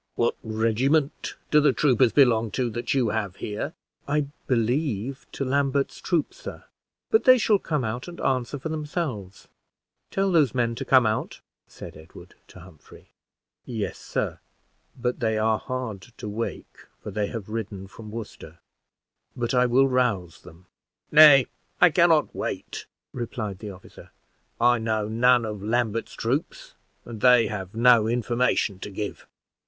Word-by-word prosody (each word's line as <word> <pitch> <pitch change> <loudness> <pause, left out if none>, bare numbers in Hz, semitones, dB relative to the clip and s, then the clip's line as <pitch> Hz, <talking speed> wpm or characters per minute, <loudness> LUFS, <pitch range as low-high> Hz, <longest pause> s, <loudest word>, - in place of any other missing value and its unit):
"What - - +1
regiment 115 +7 0 0.2
do 150 - +6
the 145 -2 +4
troopers 130 -4 +3
belong 115 -5 +4
to 125 -3 0
that 120 +4 -2
you 125 -5 +2
have 105 -4 -2
here?" 105 0 -5 0.3
"I 145 +1 +1 0.2
believe 125 0 -1
to 135 - -3
Lambert's 140 +1 0
troop, 170 -5 -1
sir; - - -9 0.5
but 440 - +3
they 255 -1 +8
shall 215 -3 +3
come 150 -7 -2
out 120 +5 -4
and 175 0 -9
answer 130 +1 -1
for 150 +4 -6
themselves. 150 - -5 0.6
Tell 195 0 0
those 150 -9 +3
men 120 -2 +1
to - - -6
come 130 -3 +5
out," 110 0 -2 0.3
said - - -11
Edward 80 +1 -14
to - - -14
Humphrey. 85 -3 -17 0.5
"Yes, 110 -5 -4
sir, - - -3 0.6
but 125 +2 -2
they 110 -3 0
are 110 0 +1
hard 125 -7 -5 0.2
to - - -7
wake, 110 +3 -5 0.3
for 105 - -6
they 105 +1 -1
have 110 -3 -6
ridden 105 -3 -5
from 105 +2 -12
Worcester; 105 -7 -9 0.8
but 120 0 -2
I 125 0 +4
will 130 +3 +4
rouse 120 -10 -1
them." 85 +3 -16 0.5
"Nay, 150 -4 +8 0.3
I - - +6
can - - +4
not - - +2
wait," - - -5 0.3
replied 110 -5 -5
the 105 - -7
officer. 95 -1 -13 0.5
"I 120 0 +4
know 110 -1 -1
none 120 +2 +3
of 105 -2 -5
Lambert's 115 +1 -1
troops, 130 +7 -3 0.3
and 115 -3 -9
they 125 -2 +6
have 95 -1 -6
no 120 -2 +5
information 120 -4 0
to 105 - -7
give." 100 +1 -6
120 Hz, 155 wpm, -25 LUFS, 110-135 Hz, 0.8 s, they